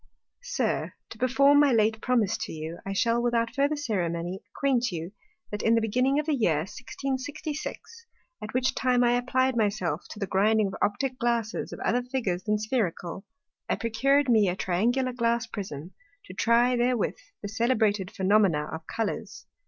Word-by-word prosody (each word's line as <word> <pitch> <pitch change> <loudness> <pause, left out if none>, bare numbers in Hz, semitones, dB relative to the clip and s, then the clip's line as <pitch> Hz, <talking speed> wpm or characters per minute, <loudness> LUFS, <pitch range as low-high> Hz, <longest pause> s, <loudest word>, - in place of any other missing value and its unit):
_ - - -47 0.4
SIR, - - -1 0.2
To - - -9
perform 275 +3 +5
my 290 -2 +5
late 220 -1 +2
promise 230 -5 +1
to - - -4
you, 160 +2 -6
I 195 - -5
shall 230 +4 +1
without 235 -1 0
further 285 +2 +1
Ceremony 180 - -2
acquaint 250 -1 0
you, 170 +1 -5 0.4
That 210 - -3
in 225 +1 +3
the - - +4
beginning 250 +5 +1
of 300 - 0
the 310 - +1
Year 170 - +2
1666 275 - -5 0.3
(at 215 +1 -6
which 255 0 +1
time 250 -1 +2
I 240 - +4
apply'd 255 +1 +1
my 220 -3 +3
self 180 -6 -3
to - - -9
the 205 - -2
grinding 210 +3 +2
of 195 - -4
Optick 255 +5 -1
glasses 235 -2 -1
of - - -7
other 245 +2 +1
Figures 245 -8 -2
than 210 +2 0
Spherical,) 205 -5 -2 0.4
I - - +2
procur'd 270 +5 +2
me 220 -5 +4
a 180 - -1
Triangular 240 +9 0
Glass 235 -1 +1
Prism, 185 -7 -7 0.3
to 185 - -10
try 235 +5 +3
therewith 245 -1 +1 0.3
the - - -3
celebrated 215 -3 +1
Phænomena 190 -6 +2
of 160 0 -7
Colours. 225 -2 -4
230 Hz, 175 wpm, -27 LUFS, 195-255 Hz, 0.4 s, perform